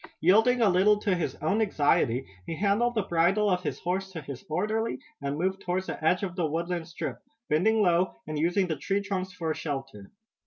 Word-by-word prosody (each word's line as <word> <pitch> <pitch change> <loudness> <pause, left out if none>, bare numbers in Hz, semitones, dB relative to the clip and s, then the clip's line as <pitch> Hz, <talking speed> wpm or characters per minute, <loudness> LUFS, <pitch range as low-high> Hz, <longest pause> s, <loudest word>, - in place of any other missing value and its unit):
Yielding 220 +8 +4
a 225 - +5
little 195 +3 +4
to 205 -2 0
his 165 -7 -2
own 195 +8 +2
anxiety, 145 - +2 0.2
he 165 - -3
handed 210 +6 +1
the 215 - +1
bridle 185 +4 +2
of 180 0 +1
his - - -3
horse 190 +2 -2
to 170 - -6
his 140 -4 -8
orderly, 215 +7 -1 0.2
and 140 +1 -2
moved 190 +3 -1
toward 180 +1 -1
the - - -6
edge 180 +5 +2
of 180 -3 -3
the 175 -4 0
woodland 170 +2 -2
strip, 170 - -5 0.3
bending 210 +8 +3
low, 175 0 +2
and 155 -1 -4
using 175 +5 +2
the 165 -3 -2
tree 195 +9 -1
trunks 190 -2 -3
for 165 -3 -2
shelter. 135 -10 -6
180 Hz, 200 wpm, -28 LUFS, 160-200 Hz, 0.3 s, a